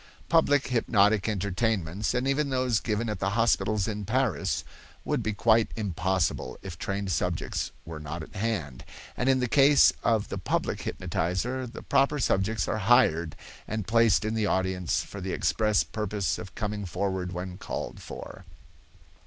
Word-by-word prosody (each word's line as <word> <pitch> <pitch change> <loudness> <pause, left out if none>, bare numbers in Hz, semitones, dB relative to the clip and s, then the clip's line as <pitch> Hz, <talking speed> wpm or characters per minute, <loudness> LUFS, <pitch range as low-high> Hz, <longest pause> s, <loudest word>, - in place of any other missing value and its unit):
Public 145 -5 +3
hypnotic 110 -4 +3
entertainments, 100 0 -1
and 125 +2 0
even 140 +1 +1
those 130 -4 +1
given 115 +1 -1
at 105 - -3
the 100 - 0
hospitals 110 -3 +2
in 105 -2 -3
Paris, 105 - 0 0.4
would - - 0
be 110 - -1
quite 110 +2 +3
impossible 95 - -1
if 95 -3 -6
trained 100 +2 -3
subjects - - -1 0.2
were 80 -1 -7
not 75 +2 -6
at - - -13
hand; 95 - -3 0.3
and 125 - 0
in 130 -1 +4
the 125 - +1
case 140 +3 +6
of 110 -3 +1
the - - -4
public - - -1
hypnotizer, 95 +9 -2
the 115 - -9
proper 140 +2 +2
subjects 110 -4 +1
are 110 - -1
hired 85 -7 +3 0.3
and 110 -2 -3
placed 115 -1 +3
in 110 - -1
the 110 -2 0
audience 95 -3 0
for 100 - -9
the 95 0 -3
express 105 -2 +2
purpose 105 -4 -2
of 90 -1 -9
coming 105 -1 -3
forward 95 0 -2
when 90 +1 -6
called - - -5
for. - - -9
105 Hz, 160 wpm, -27 LUFS, 95-115 Hz, 0.4 s, case